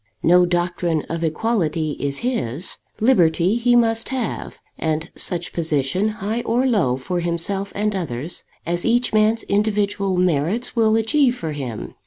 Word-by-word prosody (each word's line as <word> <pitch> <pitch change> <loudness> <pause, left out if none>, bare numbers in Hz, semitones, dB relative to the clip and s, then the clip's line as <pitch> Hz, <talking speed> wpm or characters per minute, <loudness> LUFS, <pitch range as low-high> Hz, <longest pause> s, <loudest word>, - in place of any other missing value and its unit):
No 180 +1 +5
doctrine 175 -2 0
of 165 0 -3
equality 160 -3 0
is 140 +9 -3
his. 180 - -2 0.2
Liberty 180 -6 +3
he 240 0 +3
must 225 -1 +2
have, 255 -6 -3 0.2
and 160 +1 -2
such 175 -1 -2
position, 160 +4 0
high 215 +2 -3
or 240 +3 +1
low, 185 - +2
for 175 +7 -3
himself 175 +4 -2
and 210 0 0
others, 155 -3 -3 0.2
as 175 +1 -1
each 240 +1 +2
man's 215 +1 +3
individual 200 -2 0
merits 180 - 0
will 220 -2 +3
achieve 245 +3 +3
for 165 -9 -4
him. 130 -7 -5
185 Hz, 145 wpm, -21 LUFS, 160-225 Hz, 0.2 s, No